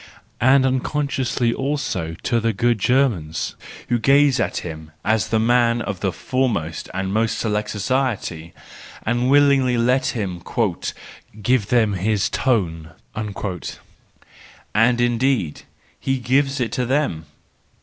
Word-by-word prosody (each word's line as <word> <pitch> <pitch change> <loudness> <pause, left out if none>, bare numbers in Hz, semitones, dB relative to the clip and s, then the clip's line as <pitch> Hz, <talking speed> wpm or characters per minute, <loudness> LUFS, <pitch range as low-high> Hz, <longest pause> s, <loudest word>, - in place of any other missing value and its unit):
And 130 +2 +5
unconsciously 130 -2 0
also 130 - -2
to 120 -2 +1
the 115 0 0
good 120 +2 +1
Germans, 105 - +1 0.4
who 120 0 +2
gaze 140 +3 +4
at - - -1
him 80 -2 -7 0.2
as 110 0 +2
the 110 - +1
man 120 +1 +3
of 100 -5 -4
the 95 -1 0
foremost 105 -11 -2
and 95 +1 -3
most 110 +1 +1
select 105 -1 -1
society, 105 -8 -2 0.5
and 120 +3 0
willingly 140 -3 +4
let 125 +3 +2
him 95 -5 -3 0.5
" 110 - -17
give 125 -4 +2
them 110 -3 +2
his 100 +1 0
tone." 85 -10 0 1.8
And 120 +3 +3
indeed 120 - +1 0.4
he 135 0 0
gives 135 +3 +1
it 120 -3 -1
to 125 -1 -1
them! 130 - 0
120 Hz, 125 wpm, -21 LUFS, 100-130 Hz, 1.8 s, And